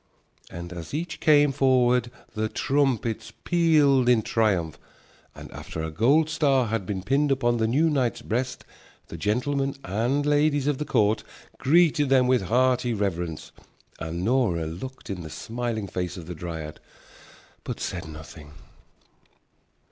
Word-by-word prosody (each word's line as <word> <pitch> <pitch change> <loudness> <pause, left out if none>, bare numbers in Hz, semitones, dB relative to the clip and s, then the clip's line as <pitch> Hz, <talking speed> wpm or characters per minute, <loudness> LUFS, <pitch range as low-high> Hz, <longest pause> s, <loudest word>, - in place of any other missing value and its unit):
And 85 +1 -8
as 85 - -7
each 165 +2 -4
came 145 -2 +5
forward 125 -3 +3 0.2
the 110 0 -2
trumpets 130 -6 0
pealed 150 -7 +3
in 120 -3 +4
triumph, 95 -10 0 0.6
and - - -11
after 80 - -6
a 80 - -4
gold 140 - +3
star 140 -6 +2
had 110 -5 -2
been 95 -3 -3
pinned 140 +7 +1
upon 120 -3 +1
the 110 -1 +1
new 145 +8 +2
knight's 135 -6 0
breast 125 +3 -3 0.4
the - - -7
gentlemen 135 +6 -1
and 120 +9 0
ladies 145 -1 +2
of 145 -2 0
the 150 - -2
court 110 -4 +2 0.4
greeted 155 -1 +3
them 130 -2 +4
with 125 -1 +3
hearty 125 +2 +2
reverence. 90 -6 -3 0.5
And 85 +2 -4
Nora 110 -9 +1
looked 100 +11 -7
in 90 -2 -5
the 80 - -8
smiling 115 +3 -4
face 90 -2 -4
of 85 - -8
the 90 - -6
dryad, 80 -2 -7 0.8
but - - -5
said 85 -2 -4
nothing. 80 -1 -11
120 Hz, 145 wpm, -25 LUFS, 90-140 Hz, 0.8 s, came